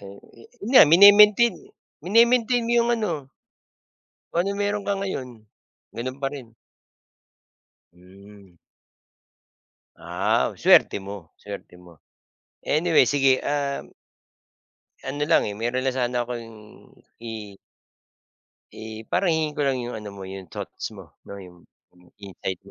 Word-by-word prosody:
Oo, 100 0 -12
yan 115 - -12
nga 265 - +10
mine-maintain, 205 +5 +7 0.5
mine-maintain 235 +3 +3
mo 235 - -1
yung 235 0 +2
ano 160 -11 -4 1.0
kung 175 +3 0
ano 200 - -3
mayro'n 205 0 -2
ka 200 - 0
ngayon. 190 -10 -4 0.6
Gano'n 130 +3 -6
pa 135 0 -4
rin? 125 -6 -10 1.4
Hmm. 95 +1 -18 1.4
Ah, - - -1
suwerte - - +4
mo, 95 -4 -10
suwerte 100 -3 -10
mo. 85 -3 -18 0.7
Anyway 155 -3 +3
sige, 135 -1 +2
um 140 -1 -3 1.1
Ano 145 +2 -5
lang, 160 -8 +2
eh, 105 - -5
mayro'n 120 +3 -2
na - - 0
sana 125 -1 -1
akong 120 -1 -7 0.8
i 110 -3 -8 1.2
I 110 0 -9
parang 195 - +1
hihingin 160 -2 0
ko - - -6
lang 135 - 0
yung 120 - -6
ano 105 -1 -7
mo, 95 - -9
yung 95 -2 -9
thoughts - - -7
mo - - -14 0.2
'no, 100 - -8
yung 90 -3 -13 0.6
insights 95 -2 -7
130 Hz, 125 wpm, -23 LUFS, -, 1.4 s, nga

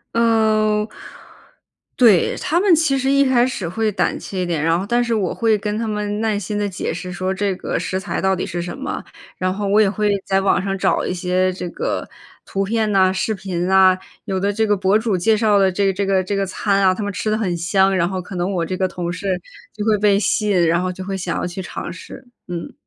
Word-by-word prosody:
嗯， 215 -2 +2 1.1
对， 220 -8 +4
他 335 - 0
们 380 -2 +5
其 310 -4 +2
实 265 - 0
一 280 0 +4
开 250 -2 +3
始 205 -9 -4
会 215 +5 -1
胆 205 - 0
怯 190 -2 -5
一 - - -1
点， 165 -3 -1
然 165 +1 +2
后 190 - -3
但 240 +1 +2
是 235 -1 0
我 195 -5 -1
会 225 -2 +2
跟 210 0 -3
他 225 0 -2
们 210 0 -2
耐 220 -2 0
心 205 +1 -4
地 205 -1 -1
解 185 - -3
释 180 +2 -6
说 185 +1 -2
这 195 0 -1
个 - - -3
食 190 - -2
材 195 - -3
到 190 0 +2
底 180 - -3
是 175 0 -4
什 175 +8 -6
么， 275 +1 -4 0.4
然 185 0 0
后 205 +1 -3
我 205 +2 +4
也 205 - +4
会 205 +1 0
在 195 0 +1
网 195 -1 +2
上 195 0 -2
找 - - +1
一 - - -2
些 185 +1 0
这 180 -1 -5
个 - - -3 0.4
图 195 - -2
片 215 +1 0
呐， 190 -2 +4
视 205 +3 -1
频 185 -3 -3
呐， 190 -1 +5 0.3
有 190 -1 -2
的 200 +2 0
这 220 +1 +1
个 205 -1 +2
博 195 +3 +3
主 220 -4 0
介 215 +5 +3
绍 215 -2 +3
的 190 -1 +3
这 195 +1 +1
这 200 +2 -1
个 190 -1 +2
这 200 +2 -2
个 195 0 0
餐 195 +1 0
啊， 185 -1 +5
他 185 - -5
们 205 - -2
吃 215 +3 -2
得 215 - +1
很 185 -6 -1
香， 190 +3 +2
然 175 -2 +2
后 185 0 -3
可 185 +2 -9
能 180 +2 -1
我 175 -3 0
这 185 +2 -4
个 185 0 +1
同 175 -1 -4
事 185 0 -2 0.3
就 210 - -4
会 215 -1 +3
被 200 -1 +3
吸 210 0 0
引， 175 -3 +3
然 170 +1 +2
后 185 - -1
就 185 - -7
会 195 0 -3
想 180 -2 -3
要 - - -2
去 180 +2 -7
尝 - - -6
试。 245 +9 -11 0.2
嗯。 175 -2 -6
195 Hz, 270 characters per minute, -20 LUFS, 185-215 Hz, 1.1 s, 们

